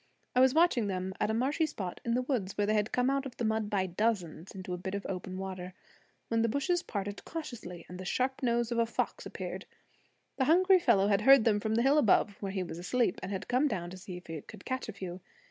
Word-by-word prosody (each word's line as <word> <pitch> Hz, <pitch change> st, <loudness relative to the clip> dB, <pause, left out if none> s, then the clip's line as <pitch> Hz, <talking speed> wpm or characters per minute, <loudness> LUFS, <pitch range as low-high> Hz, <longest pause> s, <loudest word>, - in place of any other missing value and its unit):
I -, -, +5 dB
was 260 Hz, +2 st, +5 dB
watching 315 Hz, -10 st, +4 dB
them 190 Hz, -1 st, -2 dB
at -, -, +1 dB
a -, -, +1 dB
marshy 285 Hz, +7 st, +1 dB
spot 190 Hz, -11 st, -6 dB
in 235 Hz, 0 st, 0 dB
the 255 Hz, -, +1 dB
woods, 235 Hz, -8 st, -2 dB
where 205 Hz, -, +2 dB
they 215 Hz, -, +1 dB
had 210 Hz, +1 st, +1 dB
come 250 Hz, +2 st, +2 dB
out 275 Hz, 0 st, 0 dB
of 245 Hz, -, -12 dB
the 235 Hz, -, -1 dB
mud 220 Hz, -1 st, 0 dB
by 195 Hz, -2 st, +1 dB
dozens 185 Hz, -3 st, -1 dB
into 185 Hz, -1 st, -6 dB
a -, -, -2 dB
bit 190 Hz, +2 st, -4 dB
of 200 Hz, -, -4 dB
open 185 Hz, 0 st, -5 dB
water, 185 Hz, -1 st, -6 dB, 0.5 s
when 230 Hz, 0 st, +1 dB
the 230 Hz, -, +2 dB
bushes 340 Hz, -, +1 dB
parted 205 Hz, -, -5 dB
cautiously 225 Hz, -, -7 dB
and 180 Hz, +1 st, -9 dB
the -, -, -5 dB
sharp 255 Hz, +7 st, -1 dB
nose 240 Hz, -1 st, +1 dB
of 235 Hz, -, +1 dB
a 230 Hz, -, +3 dB
fox -, -, -2 dB
appeared. -, -, -6 dB, 0.7 s
The 265 Hz, -, +2 dB
hungry 370 Hz, +5 st, +5 dB
fellow 210 Hz, -, +3 dB
had 200 Hz, 0 st, +3 dB
heard 270 Hz, +1 st, +7 dB
them 210 Hz, -3 st, +3 dB
from 220 Hz, +1 st, -1 dB
the 235 Hz, -, +3 dB
hill 280 Hz, +3 st, +5 dB
above, 215 Hz, -4 st, +4 dB
where 195 Hz, -2 st, -3 dB
he 190 Hz, -1 st, -2 dB
was 170 Hz, -1 st, -7 dB
asleep, 225 Hz, +3 st, 0 dB
and 190 Hz, -, -5 dB
had 190 Hz, -2 st, -4 dB
come 255 Hz, +4 st, +3 dB
down 175 Hz, -9 st, -3 dB
to 185 Hz, -, -8 dB
see 180 Hz, -1 st, -8 dB
if 180 Hz, -, -12 dB
he 165 Hz, -2 st, -6 dB
could -, -, -13 dB
catch 260 Hz, -3 st, -3 dB
a -, -, -5 dB
few. 185 Hz, -2 st, -7 dB
215 Hz, 255 wpm, -31 LUFS, 185-255 Hz, 0.7 s, heard